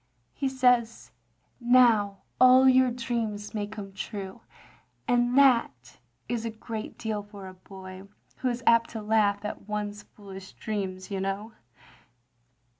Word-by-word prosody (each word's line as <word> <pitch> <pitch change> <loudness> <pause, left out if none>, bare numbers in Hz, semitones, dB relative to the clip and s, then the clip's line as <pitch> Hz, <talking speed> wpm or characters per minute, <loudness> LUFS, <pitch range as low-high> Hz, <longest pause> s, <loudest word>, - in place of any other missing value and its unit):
He 275 - -2
says, 250 -3 +1 0.5
'Now 235 -5 +3 0.2
all 255 +1 +7
your 260 0 +5
dreams 230 -4 -4
may 205 -2 -3
come 205 -2 -9
true, 195 -1 -7 0.3
' - - -35
and 245 +1 +2
that 230 - +2 0.3
is 235 -2 -2
a 230 - -2
great 220 0 -7
deal 220 -2 -3
for 205 -2 -11
a 185 - -10
boy, 190 0 -12 0.3
who 255 - -1
is 240 0 -4
apt 230 0 +4
to 225 - -6
laugh 210 -1 +1
at 210 0 -7
one's 210 0 -4
foolish 195 -3 -12
dreams, 195 -2 -5
you 195 - -2
know." 195 +3 -4
215 Hz, 140 wpm, -27 LUFS, 200-240 Hz, 0.5 s, all